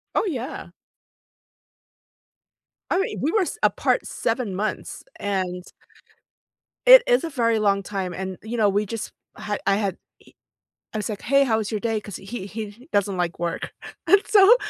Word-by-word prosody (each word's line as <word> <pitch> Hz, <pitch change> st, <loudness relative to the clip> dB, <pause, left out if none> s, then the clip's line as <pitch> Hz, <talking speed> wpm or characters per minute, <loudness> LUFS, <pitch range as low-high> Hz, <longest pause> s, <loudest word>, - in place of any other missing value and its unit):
Oh, -, -, +2 dB
yeah. 260 Hz, -8 st, -4 dB, 2.2 s
I 370 Hz, -, +2 dB
mean, 390 Hz, -, -2 dB
we 300 Hz, -, +1 dB
were 435 Hz, -, +3 dB
s 365 Hz, -, -2 dB
apart -, -, +2 dB
7 230 Hz, -8 st, -2 dB
months, 210 Hz, +3 st, -3 dB, 0.2 s
and 185 Hz, -3 st, -2 dB, 1.2 s
It -, -, +10 dB
is -, -, +4 dB
a 330 Hz, -, -2 dB
very 230 Hz, -6 st, +1 dB
long 200 Hz, -1 st, +2 dB
time, 190 Hz, -2 st, -3 dB
and, 190 Hz, +1 st, -5 dB
you 230 Hz, +2 st, -4 dB
know, 210 Hz, -2 st, +4 dB
we 205 Hz, +2 st, +1 dB
just 225 Hz, +2 st, -5 dB, 0.3 s
had 210 Hz, -1 st, -3 dB
I 195 Hz, -, +3 dB
had 200 Hz, -3 st, 0 dB, 1.0 s
he 220 Hz, -, -4 dB
I -, -, -1 dB
was 210 Hz, -, -3 dB
like, 205 Hz, -, -6 dB
"Hey, 275 Hz, +3 st, +4 dB
how 225 Hz, -3 st, +2 dB
was 215 Hz, 0 st, -3 dB
your 215 Hz, -, -2 dB
day?" 225 Hz, -1 st, -1 dB
'Cause 205 Hz, -3 st, -8 dB
he 195 Hz, 0 st, -7 dB
he 220 Hz, +5 st, -8 dB
doesn't 200 Hz, -1 st, +1 dB
like 175 Hz, -1 st, -1 dB
work, 170 Hz, 0 st, -3 dB, 0.3 s
and 400 Hz, 0 st, +6 dB
so 420 Hz, +3 st, +7 dB
215 Hz, 170 wpm, -24 LUFS, 195-255 Hz, 2.2 s, It